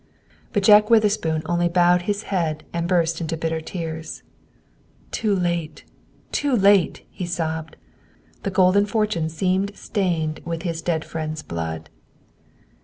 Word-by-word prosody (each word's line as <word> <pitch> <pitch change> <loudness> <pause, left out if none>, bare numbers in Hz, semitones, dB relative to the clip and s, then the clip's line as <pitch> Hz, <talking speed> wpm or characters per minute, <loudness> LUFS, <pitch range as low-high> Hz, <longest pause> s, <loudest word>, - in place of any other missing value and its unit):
But 205 - 0
Jack 210 +1 +7
Witherspoon 205 -8 +2
only 175 0 +1
bowed 175 0 +4
his 205 +1 -1
head 160 -5 -1
and 170 0 -1
burst 170 -2 +1
into 165 0 -2
bitter 160 0 -2
tears. 160 -1 -6 0.9
"Too 210 -3 0
late; 170 -3 -2 0.5
too 285 -3 +1
late!" 200 -4 +3
he 180 - -5
sobbed. 160 -2 -3 0.7
The - - -2
golden 190 +2 +4
fortune 210 -7 0
seemed 190 +4 -1
stained 170 -7 -1
with 165 0 -4
his 165 -2 -3
dead 165 -2 -1
friend's 155 -1 -4
blood. 80 -1 -5
175 Hz, 130 wpm, -23 LUFS, 160-195 Hz, 0.9 s, Jack